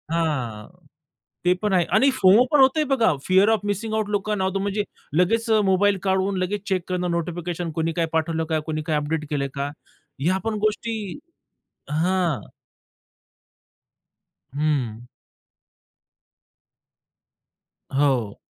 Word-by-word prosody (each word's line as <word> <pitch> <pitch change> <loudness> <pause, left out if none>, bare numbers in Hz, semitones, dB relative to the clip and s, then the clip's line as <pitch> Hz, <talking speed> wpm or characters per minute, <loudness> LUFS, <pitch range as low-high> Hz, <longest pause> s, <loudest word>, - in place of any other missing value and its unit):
हां. 145 -10 -2 0.8
ते 180 - +4
पण 210 -1 0
आहे 180 -2 +4
आणि 270 +5 +5
फोमो 220 -2 +5
पण 295 - +5
होतंय 270 +4 +4
बघा, 245 - +2
फिअर 190 +3 +5
ऑफ 225 - +2
मिसिंग 210 +2 -2
आउट 215 -1 0
लोकांना 205 -1 -1
होतो, 190 +1 0
म्हणजे 200 +1 -1 0.3
लगेच 225 +6 +2
अ, 220 -1 +5
मोबाईल 195 +1 +3
काढून 190 0 +1
लगेच 195 +2 -2
चेक 190 -2 0
करणं, 180 -1 -1
नोटिफिकेशन 170 0 -3
कोणी 165 +1 -1
काय 165 0 0
पाठवलं 160 0 0
का, 160 0 -1
कुणी 155 -1 -2
काय 155 -3 +1
अपडेट 150 +1 -1
केलं 140 -2 0
का? 140 0 -2 0.5
ह्या 185 +5 +2
पण 225 -1 -1
गोष्टी 220 +2 -2 1.0
हां. 170 -1 +1 2.2
हं. 140 -7 -1 3.0
हो. 130 -8 +1
180 Hz, 125 wpm, -23 LUFS, 160-205 Hz, 3.0 s, आणि